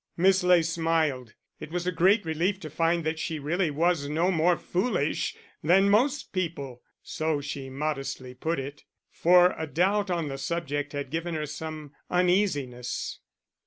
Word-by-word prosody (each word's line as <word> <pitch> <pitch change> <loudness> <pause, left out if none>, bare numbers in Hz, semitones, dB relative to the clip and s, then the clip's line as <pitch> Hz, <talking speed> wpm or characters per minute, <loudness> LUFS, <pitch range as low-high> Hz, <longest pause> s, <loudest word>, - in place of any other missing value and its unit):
Miss 190 +2 +4
Ley 180 -2 +5
smiled; 160 -7 0 0.2
it - - -8
was 175 +1 -3
a 180 - +1
great 185 +4 +3
relief 170 +5 0
to 155 - -7
find 165 +2 +1
that 160 0 -2
she 160 0 -3
really 165 +4 0
was 155 -1 +1
no 165 +5 +1
more 170 0 +3
foolish 180 - -1 0.3
than 190 +5 +5
most 260 +7 +2
people 150 -9 -3 0.2
(so 155 -2 -1
she 140 -1 -6
modestly 135 -2 -4
put 160 +6 -2
it), 140 +2 -6 0.3
for 180 +1 +5
a 160 - -3
doubt 195 +6 +1
on 170 -4 -1
the 135 -1 -5
subject 145 -1 -3
had 140 -1 -4
given 165 +1 -2
her 155 -1 -2
some 155 0 -7 0.2
uneasiness. 175 -10 0
160 Hz, 160 wpm, -27 LUFS, 145-180 Hz, 0.3 s, Ley